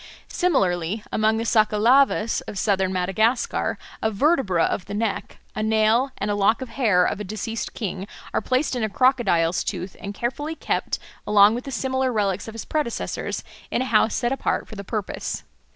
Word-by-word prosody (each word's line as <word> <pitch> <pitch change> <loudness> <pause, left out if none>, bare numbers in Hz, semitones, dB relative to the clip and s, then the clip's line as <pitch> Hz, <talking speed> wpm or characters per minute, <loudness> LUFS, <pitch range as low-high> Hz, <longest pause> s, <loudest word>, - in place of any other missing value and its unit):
Similarly 195 - +1
among 220 +1 +2
the 225 - -2
Sakalavas 225 +2 +3
of 205 - -6
southern 190 -2 +1
Madagascar 195 +7 0 0.2
a 220 - +2
vertebra 215 - +2
of 180 - -1
the 200 - -6
neck, 205 -2 -2 0.2
a - - -3
nail, 220 +4 +3
and 205 +1 -1
a - - +1
lock 205 +4 +2
of 255 - -9
hair 205 -10 +3
of - - -1
a - - -3
deceased 215 +2 -4
king 195 -2 -4 0.3
are - - +1
placed 260 +2 0
in 245 - -1
a 220 - 0
crocodile's 200 -9 +2
tooth 185 -1 -4
and 200 +1 -6
carefully 290 +8 -3
kept - - -1 0.3
along 210 0 +6
with 245 +2 -4
the 275 - -5
similar 260 +1 0
relics 200 -3 -1
of 225 - -8
his 225 - -6
predecessors 300 -7 -2 0.3
in 255 - 0
a 255 -3 -5
house 215 0 +4
set 240 0 0
apart 270 - -1
for - - -12
the 200 -2 -6
purpose. 210 -1 -4
220 Hz, 185 wpm, -23 LUFS, 200-245 Hz, 0.3 s, along